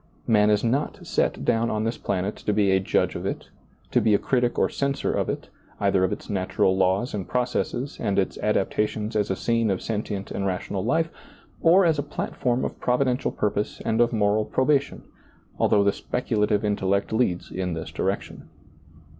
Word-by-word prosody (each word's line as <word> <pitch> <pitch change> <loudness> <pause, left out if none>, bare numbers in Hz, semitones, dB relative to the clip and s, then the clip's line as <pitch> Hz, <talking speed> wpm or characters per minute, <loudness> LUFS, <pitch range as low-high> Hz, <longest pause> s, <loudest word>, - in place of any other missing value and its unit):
Man 105 -2 +4
is 105 -1 +2
not 130 +5 -1
set - - 0
down 115 +1 +2
on 110 0 -1
this 115 +1 -2
planet 100 +1 -2
to 105 - -1
be 100 -2 +3
a 95 - +4
judge 95 - +1
of - - -5
it, - - -5 0.4
to - - +3
be 105 -2 +4
a - - +5
critic 120 0 0
or - - +3
censor 140 0 -1
of - - -1
it, - - -4 0.3
either 100 -2 +2
of 95 - +1
its - - -5
natural 95 -1 +1
laws 95 +5 +1
and 100 -3 -4
processes, 125 +2 -2
and 100 -4 -1
its 95 - +1
adaptations 105 +1 0
as 105 -1 +1
a 95 - 0
scene 115 +1 +1
of 95 -2 0
sentient 105 -2 -4
and 100 0 -2
rational 95 +1 -2
life, 160 +8 +1 0.5
or 175 +3 +6
as 160 -3 +2
a - - +2
platform 130 -3 -2
of - - -5
Providential 125 0 +1
purpose 105 0 -2
and 115 +1 +2
of 120 - +3
moral 105 -1 +2
probation, 135 +5 0 0.6
although 100 - +4
the 100 - +4
speculative 105 -4 0
intellect 100 0 0
leads 110 -7 0
in 90 -2 -2
this 80 - -6
direction. - - -3
105 Hz, 185 wpm, -25 LUFS, 100-125 Hz, 0.6 s, or